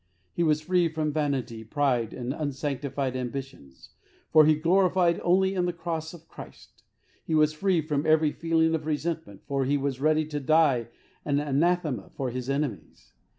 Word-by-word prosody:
He - - -2
was 155 -2 +2
free 180 +1 +2
from 155 -1 -2
vanity, 130 -7 -2
pride, 125 -2 0
and 125 +1 -4
unsanctified 140 -2 -3
ambitions, 125 - -7 0.4
for 155 -1 +7
he 155 - +5
gloried 175 +1 +2
only 190 +2 +3
in 180 -2 0
the - - 0
Cross 165 -1 -5
of 165 -1 -16
Christ. - - -13 0.4
He 160 - -1
was 155 0 +3
free 180 +1 +1
from 150 0 -2
every 155 -1 +4
feeling 165 0 +1
of 155 -1 -2
resentment, 155 - -3
for 140 -1 -1
he 140 +2 +1
was 135 -1 -3
ready 155 +1 +2
to 150 -1 -4
die 140 -4 +3 0.4
an 145 -1 0
anathema 150 - 0
for 130 -2 -4
his 125 +1 -5
enemies. 140 -1 -4
150 Hz, 165 wpm, -27 LUFS, 135-165 Hz, 0.4 s, for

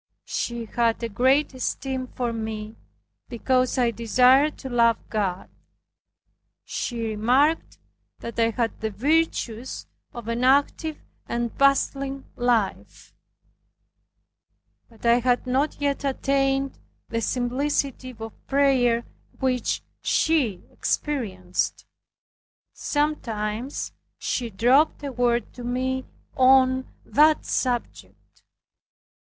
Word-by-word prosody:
She 235 -1 -3
had 230 +1 0
a 230 - -1
great 260 +7 +2
esteem 260 0 -3
for 245 -1 -3
me, 220 -1 -5 0.5
because 255 +2 +1
I 240 -2 +3
desired 255 +6 +4
to - - -8
love 235 -2 +3
God. 195 -4 -1 1.2
She 235 -2 -3
remarked 255 +9 +2 0.4
that 235 0 -7
I 230 0 +4
had 230 0 -2
the 220 - -1
virtues 260 -1 -1 0.3
of 235 -2 -9
an 230 +1 -1
active 285 +4 +2 0.3
and 235 -1 -2
bustling 275 0 +1
life; 240 -5 -1 1.8
but 230 0 -14
I 235 +1 +5
had 245 +1 +1
not 265 +4 0
yet 285 -1 -1
attained 270 0 0 0.3
the 230 - -1
simplicity 255 +1 -1
of 225 -1 -10
prayer 255 -4 +3 0.3
which 255 -2 0 0.2
she 260 - +1
experienced. 190 -11 -2 0.9
Sometimes 245 -5 -2 0.3
she 240 -2 -2
dropped 255 +10 +3
a 280 - -3
word 240 -1 0
to 245 - -9
me 255 +2 -1 0.3
on 260 0 +4
that 305 +2 +4
subject. 245 -2 -3
250 Hz, 100 wpm, -24 LUFS, 230-270 Hz, 1.8 s, I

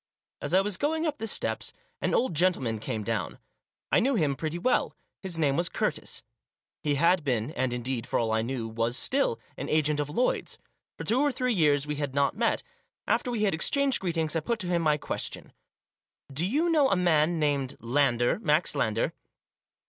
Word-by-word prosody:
As 145 +5 0
I 190 - +6
was 200 -1 -2
going 315 +3 0
up 300 -2 -2
the 225 - -3
steps - - -1 0.3
an - - +1
old 250 - +1
gentleman 145 -10 +1
came 110 0 -3
down. - - -2 0.5
I - - +5
knew 265 +2 +2
him 150 -9 +1
pretty 160 +3 -3
well. 250 +9 +1 0.3
His 185 -4 -4
name 145 -4 +2
was 170 +2 +1
Curtis. - - -3 0.6
He 145 -1 0
had 170 +3 +3
been, 125 -2 -1
and, 130 -4 -1
indeed, 125 -1 -3
for - - 0
all 115 -1 0
I 110 0 +2
knew, 120 -1 -3
was 115 +2 0
still 270 - +2 0.2
an 140 - -5
agent 150 -1 +2
of 145 -1 -1
Lloyd's. 245 +12 0 0.4
For - - -5
two 235 +4 +2
or 290 0 +3
three 250 -1 0
years 150 -6 +3
we 150 -1 -3
had 145 -2 -3
not 140 +4 +2
met. 230 +2 +1 0.4
After - - +1
we 230 -3 -1
had 200 - +2
exchanged 275 - +2
greetings, 165 -3 -1
I - - +3
put 230 +9 -1
to 180 - -4
him 175 -1 +1
my 150 -2 +3
question. - - -4 0.8
"Do 160 +7 0
you 310 - +1
know 295 -4 +4
a - - +3
man 170 -2 +3
named 140 -4 0
Lander, 120 - +1
Max 155 -5 +2
Lander 115 -6 0
155 Hz, 195 wpm, -28 LUFS, 135-205 Hz, 0.8 s, I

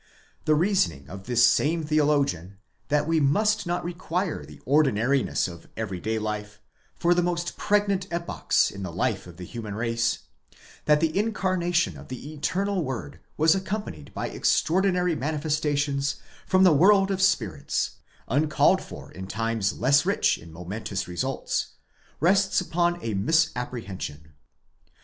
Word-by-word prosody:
The 155 - +4
reasoning 150 - +1
of 95 0 -9
this 120 -1 +5
same 160 +2 +2
theologian, 145 - +1 0.3
that 150 +1 +1
we 165 -1 +2
must 210 +8 +2
not 175 -1 -1
require 175 0 -3
the - - -13
ordinariness 135 -2 +2
of 85 -2 -11
every 100 -5 -3
day 110 +5 -2
life 105 -1 -4 0.4
for 175 +1 +3
the 175 - +2
most 175 0 -2
pregnant 200 -2 +1
epochs 170 0 0
in 100 - -8
the 90 -3 -4
life 95 +3 -1
of 85 -1 -12
the 90 - -8
human 110 0 -6
race; 115 0 -1 0.6
that 150 0 +4
the 160 -1 +1
incarnation 185 -4 0
of - - -12
the 130 +4 -7
eternal 185 +5 -1
word 130 +1 -5 0.2
was 160 +1 +5
accompanied 190 - -4
by - - -3
extraordinary 180 0 +2
manifestations 145 -1 -1 0.3
from 185 0 +4
the 180 -4 +7
world 195 +5 +5
of 190 -1 -1
spirits, 110 - 0 0.3
uncalled 150 +5 +3
for - - -10
in 95 +2 -8
times 115 -1 -1
less 140 +4 +4
rich - - +2
in 85 0 -13
momentous 95 +4 -5
results,)® 90 -1 -2 0.4
rests 190 +4 +3
upon 175 -1 0
a 110 - -2
misapprehension. 100 - -1
145 Hz, 140 wpm, -26 LUFS, 110-175 Hz, 0.6 s, the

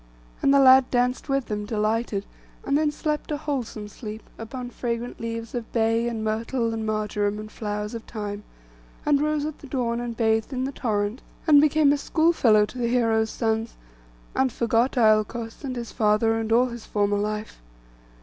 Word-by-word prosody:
And 275 - +4
the 280 - +6
lad 260 -1 +7
danced 250 +3 0
with 275 -2 +1
them, 210 -1 -3
delighted, 215 -1 -1 0.4
and 275 - +1
then 300 0 +2
slept 300 0 -3
a 300 - -1
wholesome 260 -8 -4
sleep, 215 +1 -8 0.2
upon 245 +2 -6
fragrant 240 0 -4
leaves 230 0 -5
of 240 -2 -5
bay, 230 0 +2
and 225 -2 -3
myrtle, 230 +2 -1
and 220 -1 -3
marjoram, 210 -1 -1
and 215 0 -8
flowers 210 0 -4
of 230 - -5
thyme; 210 -2 -5 0.6
and 290 -1 +3
rose 300 -1 0
at 310 -1 -5
the 280 - -11
dawn, 240 -3 -1
and 240 -1 -5
bathed 220 +1 +1
in 255 0 -1
the 270 - -2
torrent, 215 -2 -2 0.2
and 295 -3 +7
became 300 -1 +4
a - - +1
schoolfellow 270 -11 +3
to 250 - -10
the 235 - +1
heroes' 225 -2 +2
sons, 225 0 -1 0.6
and 265 -1 +2
forgot 235 +3 +1
Iolcos, 225 +2 +2
and 260 -2 -4
his 235 -1 -5
father, 215 0 +2
and 225 0 -3
all 240 +2 +5
his 235 -2 -9
former 205 -1 +1
life. 210 - -4
230 Hz, 180 wpm, -25 LUFS, 215-260 Hz, 0.6 s, lad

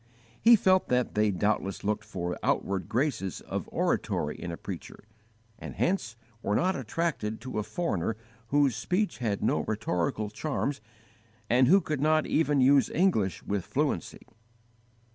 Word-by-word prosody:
He 235 +1 +8
felt 185 -3 +3
that 125 -1 +1
they 105 0 +2
doubtless 100 0 -1
looked 105 +1 -1
for 90 -1 -4
outward 100 0 -1
graces 115 - -1
of - - -5
oratory 75 0 0
in 85 - -6
a 85 - -5
preacher, - - -8 0.6
and - - -8
hence 170 - 0 0.3
were 105 - 0
not 185 - +2
attracted 130 -4 -2
to 130 -4 -4
a - - -1
foreigner 110 - -2 0.3
whose 140 -3 +3
speech 195 -1 -1
had 110 -5 -1
no - - +2
rhetorical 105 +1 -2
charms 140 0 -2 0.7
and 125 +1 +5
who 195 +7 +6
could 150 -4 -3
not 155 +1 +3
even 145 -3 +2
use 135 +1 +5
English 130 - +1
with 100 -2 -2
fluency. - - -2
120 Hz, 145 wpm, -28 LUFS, 100-155 Hz, 0.7 s, He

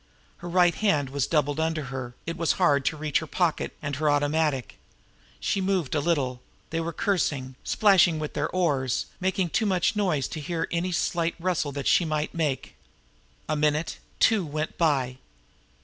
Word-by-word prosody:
Her 175 - -7
right 175 0 +4
hand 150 -11 +1
was 140 -2 0
doubled 150 -2 +1
under 160 -1 0
her, 125 -2 -5
it 165 - -3
was 165 -1 +1
hard 145 -7 +2
to 155 - 0
reach 150 -1 0
her 160 - -7
pocket 170 0 -1
and 145 -2 -3
her 155 0 +1
automatic. 145 -2 0 0.6
She 195 - 0
moved 185 -7 0
a 155 - +2
little; 140 -6 0 0.3
they 165 - -1
were 165 +1 -3
cursing, 145 -9 -1
splashing 190 -6 +4
with 155 -1 -4
their 150 - -1
oars, 145 -9 0
making 185 -2 0
too 220 - +1
much 185 +2 +1
noise 175 - +1
to 155 - -5
hear 165 +2 -2
any 175 +2 -1
slight 170 -1 0
rustle 170 -4 0
that 140 0 -4
she - - +4
might 155 -2 -2
make. 150 -5 -2 0.7
A 155 - 0
minute, 150 +1 0 0.2
two, 220 -4 +4
went 155 0 -3
by. 135 -6 +1
155 Hz, 175 wpm, -26 LUFS, 145-175 Hz, 0.7 s, right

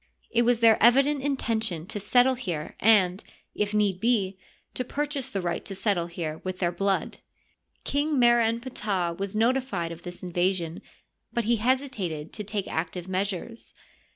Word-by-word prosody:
It 235 - +3
was 240 -1 +2
their 225 -1 +6
evident 275 +5 +5
intention 225 - -1
to 205 - -5
settle 245 +6 +4
here 175 -12 -4
and, 195 -3 +4 0.3
if 205 0 -1
need 205 -3 +1
be, 205 -4 +1 0.4
to 255 - -2
purchase 285 +1 -3
the 195 -2 -3
right 170 -1 -2
to 195 - -4
settle 190 -4 0
here 165 -2 -5
with 185 0 -4
their 175 -2 0
blood. 195 +2 -1 0.6
King 290 +1 0
Mer 240 -1 +5
en 230 +1 +1
Ptah 205 -8 -2
was 195 +1 -4
notified 225 -7 0
of 170 0 -8
this 175 +1 -8
invasion, 175 -1 -1 0.5
but 235 - 0
he 235 +2 +2
hesitated 215 - -1
to 210 - -5
take 205 -1 -3
active 170 +2 -3
measures. 195 +4 -4
205 Hz, 160 wpm, -26 LUFS, 180-240 Hz, 0.6 s, their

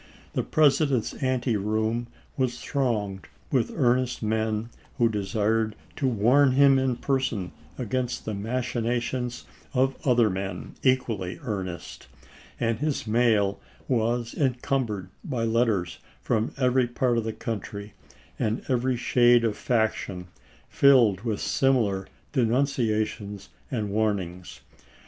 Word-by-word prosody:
The - - +1
Presi 155 0 +3
dent's 125 -5 0
anteroom 115 -3 0 0.3
was 125 -2 -1
thronged 105 -8 -2 0.2
with 130 -4 +1
earnest 125 -1 +1
men 110 +1 -1 0.3
who 120 -1 +4
desired 110 +1 0 0.2
to 140 - +1
warn 125 +4 +4
him 135 0 +6
in 130 -2 +1
person 120 -8 -1 0.3
against 125 +1 -2
the 110 - -3
machinations 120 +2 -2 0.3
of 130 +1 +2
other 120 -4 +4
men 95 0 -4
equally 115 -8 0
earnest, 95 - -5 0.5
and 115 -2 0
his 150 -5 -1
mail 110 -3 +2 0.3
was 120 -1 0
encumbered 125 -6 -1
by 130 - -2
letters 110 -6 +1 0.2
from 115 -1 0
every 125 -1 +3
part 120 0 +1
of - - -3
the 110 - -2
country, 105 -2 -6 0.5
and 110 +2 -1
every 125 -1 +1
shade 120 0 +4
of 110 -2 +1
faction, 105 -6 -1 0.4
filled 120 -9 +5
with 110 -3 -2
similar 110 -8 +1 0.3
denunciations 110 -6 0 0.2
and 110 -6 -2
warnings. 95 -5 -2
115 Hz, 115 wpm, -26 LUFS, 105-130 Hz, 0.5 s, him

